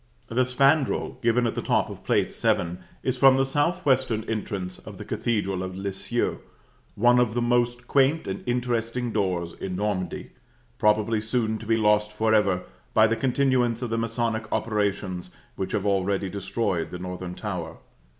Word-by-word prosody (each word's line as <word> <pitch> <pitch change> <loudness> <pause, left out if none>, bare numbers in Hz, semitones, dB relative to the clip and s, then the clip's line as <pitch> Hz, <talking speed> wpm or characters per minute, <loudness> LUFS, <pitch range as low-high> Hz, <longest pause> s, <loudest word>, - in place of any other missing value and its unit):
The 120 +3 +1
spandril, 135 +3 +2
given 120 +1 +2
at 115 - 0
the - - -3
top - - +1
of - - -10
Plate - - +1
VII., 85 0 +1 0.3
is 130 -1 -1
from 135 0 +7
the 135 - +3
southwestern 135 -5 +1
entrance 100 -4 -4
of 105 -3 -11
the 105 - -8
Cathedral 100 -6 -1
of 95 0 -5
Lisieux; 95 0 -2 0.6
one 120 +3 +5
of 120 -2 +1
the - - +2
most 120 0 +1
quaint 140 +4 +3
and 95 0 -4
interesting 120 0 -1
doors 90 -5 -1
in 95 -1 -5
Normandy, 95 -3 -2 0.5
probably 105 +1 +2
soon 110 0 -1
to 110 - -9
be 115 0 +3
lost 105 -1 +3
forever, 105 -4 +2 0.3
by 110 - +7
the 115 +1 +2
continuance 125 -1 +1
of 120 - -3
the 115 - 0
masonic 115 -1 -2
operations 100 -4 -1 0.2
which 95 0 -4
have 100 - 0
already 100 -1 +1
destroyed 95 -2 -2
the 90 - -6
northern 90 0 -6
tower. 90 -6 -5
110 Hz, 160 wpm, -25 LUFS, 95-120 Hz, 0.6 s, from